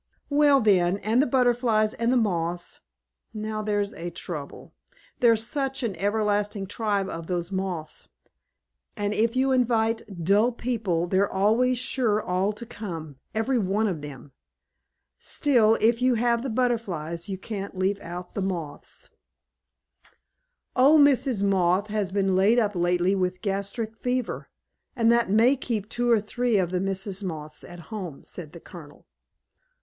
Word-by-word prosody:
"Well, 285 -1 +5
then, 190 -3 +3
and 220 +5 +2
the 290 - +1
Butterflies 240 -4 +2
and 230 +1 0
the 255 - +3
Moths. 175 -5 -1 0.6
Now, 215 0 -3
there's 205 -1 -1
a 170 +1 -5
trouble. 165 -4 -8 0.5
There's 230 -2 +4
such 270 0 -2
an 215 -5 -2
everlasting 205 -1 0
tribe 205 -1 -1
of 165 -3 -6
those 175 0 -2
Moths; 185 -5 -4 0.9
and 205 0 -1
if 230 +3 +1
you 265 +1 +2
invite 230 -3 +2 0.2
dull 210 +7 +3
people 215 -9 -1
they're 190 +3 +1
always 225 +6 +2
sure 230 -3 +1
all 185 0 0
to 215 +3 -8
come, 165 - -7 0.2
every 240 +3 +1
one 205 +2 0
of 175 -7 -3
them. 140 -2 -10 0.9
Still, 230 -6 +3
if 230 +2 +2
you 255 -1 +3
have 235 0 +1
the 265 - -3
Butterflies, 200 -9 -2
you 190 - -3
can't 200 -1 -6
leave 195 +2 0
out 175 +1 -8
the 200 - -3
Moths." 170 -6 -5 1.7
"Old 285 +4 +6
Mrs. 265 -6 +3
Moth 190 +1 +2
has 205 -3 -1
been 195 -1 +1
laid 200 +5 +4
up 210 -3 +2
lately 175 +1 +1
with 185 -2 0
a - - -28
gastric 205 +2 -3
fever, 250 0 -2 0.5
and 230 -2 +3
that 235 -3 +2
may 230 +7 +5
keep 225 -6 -3
two 240 +2 -1
or 230 -2 +5
three 235 +2 0
of 180 -2 0
the 180 -1 0
Misses 195 +1 -2
Moth 155 -4 -6
at 175 - -11
home," 180 -9 -6
said 160 -4 -9
the 170 - -9
Colonel. 155 -4 -13
205 Hz, 155 wpm, -25 LUFS, 185-235 Hz, 1.7 s, Old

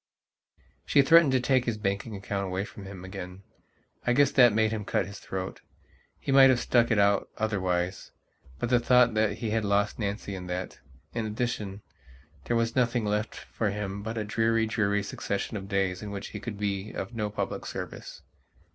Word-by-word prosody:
She 140 - +4
threatened 165 0 +6
to 130 - +4
take 125 0 +2
his 115 -2 -1
banking 100 +2 -2
account 100 0 -3
away 95 +2 -2
from 100 -2 -11
him 95 -2 -9
again. 95 0 -8 0.6
I 125 - +2
guess 140 +2 +4
that 125 -3 +6
made 110 +1 +2
him 110 -2 -3
cut 95 - 0
his 100 +1 -9
throat. 95 0 -5 0.6
He - - -3
might 135 0 +8
have 125 -2 +4
stuck 120 -1 +3
it 115 - +2
out 100 -1 +3
otherwisebut 95 - -3
the 125 -1 +4
thought 125 -1 +4
that 110 0 +1
he 115 -3 -3
had 110 0 +1
lost 100 +1 +1
Nancy 100 -1 -3
and 90 -1 -7
that, 90 +1 -4 0.3
in 115 -2 -2
addition, 105 -3 -3 0.6
there 120 - +1
was 115 0 0
nothing 120 -2 +1
left 105 +1 -1
for 110 - -3
him 100 -1 -4
but 110 +2 -5
a 110 - -1
dreary, 115 +1 +1
dreary 105 -2 0
succession 100 +1 -3
of 100 -1 -6
days 95 -2 0
in 105 - -6
which 100 0 -6
he 105 - -7
could 105 -1 -6
be 100 0 -2
of - - -5
no 105 -2 -2
public 105 - -4
service... - - -7
105 Hz, 190 wpm, -28 LUFS, 100-115 Hz, 0.6 s, might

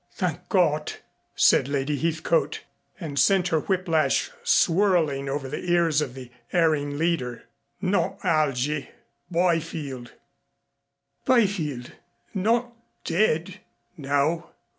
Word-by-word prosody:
"Thank 180 -1 -3
God!" 155 -5 +2 0.4
said - - +4
Lady 140 +1 -1
Heathcote, 165 +2 0 0.4
and 150 -6 -3
sent 185 +6 +3
her 160 - +2
whiplash 180 - +1
swirling 170 - +2
over 135 0 -3
the 140 - -5
ears 170 -3 +3
of 135 -4 -4
the 125 -2 -10 0.2
erring 150 -4 +1
leader. 150 -7 -1 0.4
"Not 195 0 0
Algy 150 -2 0 0.4
Byfield 165 -7 -1 0.6
" 140 0 -52
"Byfield 180 - +1 0.4
not 230 +5 +1 0.3
dead 180 0 0 0.2
?" - - -46
"No. 145 +3 0
160 Hz, 105 wpm, -25 LUFS, 140-180 Hz, 0.6 s, said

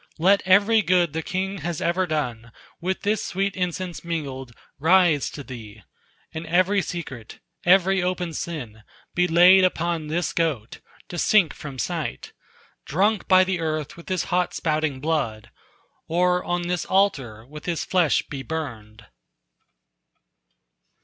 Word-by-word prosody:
Let 195 +5 +4
every 205 +4 +5
good 175 -3 +2
the 160 - -2
king 190 +3 -3
has 170 -2 -4
ever 180 +2 0
done 120 -8 -3 0.3
With 185 +2 -3
this 210 +1 0
sweet 195 +1 -2
incense 180 -1 -3
mingled 140 -7 -4 0.3
rise 165 -2 +4
to 145 - -8
thee; 110 -5 -10 0.5
And 160 +1 -6
every 185 +4 +3
secret, 145 -10 -7 0.3
every 190 +1 +4
open 180 -2 -2
sin 130 -10 -6 0.3
Be 180 0 +2
laid 180 +3 +7
upon 170 -3 0
this 170 +3 -1
goat, 145 -10 -2 0.3
to 175 - -5
sink 185 -6 +4
from 140 -3 -9
sight, 65 - -4 0.5
Drunk 200 +7 +1
by 185 0 +6
the 185 -1 -1
earth 155 -2 -3
with 170 - -12
his 185 -2 0
hot 180 0 +1
spouting 155 -4 -1
blood, 140 -9 -2 0.6
Or 180 +2 +2
on 175 0 -1
this 175 0 -1
altar 135 - 0
with 150 +3 -11
his 170 -2 -2
flesh 180 -5 +2
be 140 -2 -7
burned." 115 -9 -6
170 Hz, 140 wpm, -24 LUFS, 145-185 Hz, 0.6 s, laid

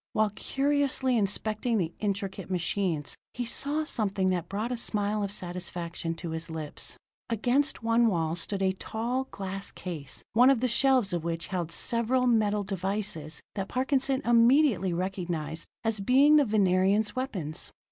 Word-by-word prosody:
While 215 -1 +2
curiously 270 +2 +1
inspecting 215 +2 0
the 170 -4 -1
intricate 195 -2 -3
machines, 175 -3 -1 0.2
he 245 - -2
saw 290 +6 -1
something 195 - 0
that 175 -2 -2
brought 215 +5 -2
a - - 0
smile 210 -2 0
of 200 -1 -2
satisfaction 175 -3 -3
to 165 0 -6
his 160 +1 -4
lips. 155 -2 -4 0.3
Against 245 +5 +1
one 230 +1 +4
wall 165 -5 0
stood 195 +3 -1
a 190 - +3
tall, 235 +7 -2
glass 195 -3 -5
case, 155 -7 -7
one 245 +4 +6
of 270 -4 +4
the 255 - +1
shelves 255 -4 +3
of 170 -2 -1
which 165 0 -3
held 180 -4 -2
several 235 +8 +1
metal 210 -4 +2
devices 190 -5 -3
that 195 -1 -3
Parkinson 265 +1 0
immediately 235 - +4
recognized 170 -3 -3 0.2
as 225 -2 0
being 275 +8 +5
the 290 - +5
Venerians' 205 0 +2
weapons. 190 - -4
205 Hz, 150 wpm, -28 LUFS, 180-240 Hz, 0.3 s, one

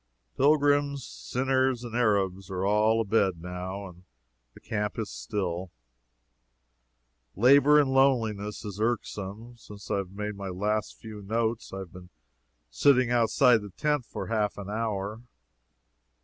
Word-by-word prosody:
Pilgrims, 145 -1 +2
sinners 130 -1 -1
and 120 -1 -7
Arabs 95 -5 +1
are 95 0 -2
all 105 +2 +3
abed, 100 -5 +1
now, 90 +3 -6
and 90 0 -15 0.5
the - - -13
camp 105 -1 -3
is 110 -2 -4
still. 95 -3 -3 1.7
Labor 140 +7 +6
in 140 -2 +2
loneliness 115 -6 +1
is 100 -1 -6
irksome. 110 0 -3
Since 105 -2 -11
I 100 - +1
made 100 +2 -6
my 100 -1 -6
last 105 +3 -2
few 110 -2 -9
notes, 110 +2 -2
I 95 - -6
have 95 -3 -8
been 90 -1 -12 0.6
sitting 125 - +3
outside 120 0 +4
the 105 - -8
tent 150 +5 -1
for - - -5
half 105 -2 -1
an 100 0 -6
hour. 110 -1 -3
105 Hz, 135 wpm, -27 LUFS, 100-120 Hz, 1.7 s, Labor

